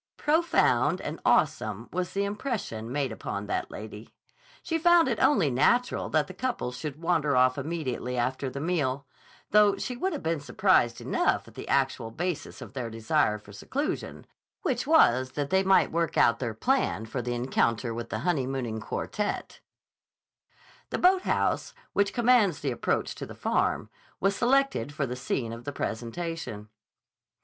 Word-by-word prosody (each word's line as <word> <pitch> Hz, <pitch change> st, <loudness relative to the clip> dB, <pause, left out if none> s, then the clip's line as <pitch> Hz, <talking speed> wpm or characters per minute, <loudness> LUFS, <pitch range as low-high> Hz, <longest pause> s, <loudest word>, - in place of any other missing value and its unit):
Profound 320 Hz, +3 st, +2 dB
and -, -, -5 dB
awesome -, -, +1 dB
was 180 Hz, -1 st, -2 dB
the 200 Hz, -, 0 dB
impression 200 Hz, -, -4 dB
made 140 Hz, -2 st, -1 dB
upon 100 Hz, -2 st, -5 dB
that -, -, -2 dB
lady. 105 Hz, +1 st, -9 dB, 0.5 s
She 330 Hz, -1 st, -1 dB
found 345 Hz, -1 st, +5 dB
it 235 Hz, -4 st, -1 dB
only 180 Hz, -, +3 dB
natural 240 Hz, -, +2 dB
that -, -, +2 dB
the -, -, -10 dB
couple 255 Hz, -, -2 dB
should 145 Hz, +3 st, -6 dB
wander 150 Hz, -5 st, +2 dB
off 130 Hz, 0 st, +4 dB
immediately 140 Hz, -4 st, -3 dB
after 130 Hz, +2 st, -1 dB
the 140 Hz, -, -6 dB
meal; 145 Hz, -4 st, -1 dB, 0.5 s
though 210 Hz, -1 st, +5 dB
she 250 Hz, -, -4 dB
would 375 Hz, +10 st, -1 dB
have -, -, -5 dB
been 165 Hz, 0 st, 0 dB
surprised 145 Hz, -5 st, +2 dB
enough -, -, 0 dB
at -, -, -14 dB
the -, -, -8 dB
actual 135 Hz, -4 st, +1 dB
basis 175 Hz, +7 st, -4 dB
of 105 Hz, -, -12 dB
their 125 Hz, -3 st, -4 dB
desire 110 Hz, -1 st, +1 dB
for 105 Hz, -1 st, -15 dB
seclusion, 280 Hz, -, -4 dB, 0.4 s
which 265 Hz, -8 st, -1 dB
was 130 Hz, -, +4 dB
that 145 Hz, -1 st, -3 dB
they 190 Hz, 0 st, +4 dB
might 190 Hz, 0 st, +4 dB
work 165 Hz, -1 st, -1 dB
out 115 Hz, 0 st, +4 dB
their 115 Hz, -4 st, -3 dB
plan 250 Hz, -, 0 dB
for 120 Hz, +3 st, -4 dB
the 120 Hz, 0 st, -3 dB
encounter 120 Hz, -1 st, 0 dB
with 120 Hz, 0 st, -5 dB
the -, -, -3 dB
honeymooning 135 Hz, -8 st, -1 dB
quartette. 210 Hz, -, -3 dB, 1.3 s
The -, -, -2 dB
boathouse, 370 Hz, +1 st, +2 dB, 0.2 s
which 200 Hz, -1 st, +2 dB
commands 235 Hz, -, +3 dB
the -, -, -1 dB
approach -, -, -1 dB
to -, -, -7 dB
the -, -, -10 dB
Farm, -, -, 0 dB, 0.3 s
was 195 Hz, +1 st, +2 dB
selected 270 Hz, -, +2 dB
for 140 Hz, -, 0 dB
the 125 Hz, -1 st, -4 dB
scene 125 Hz, -2 st, -2 dB
of 115 Hz, +1 st, -8 dB
the 145 Hz, -, -4 dB
presentation. 120 Hz, -2 st, -4 dB
145 Hz, 160 wpm, -28 LUFS, 120-205 Hz, 1.3 s, found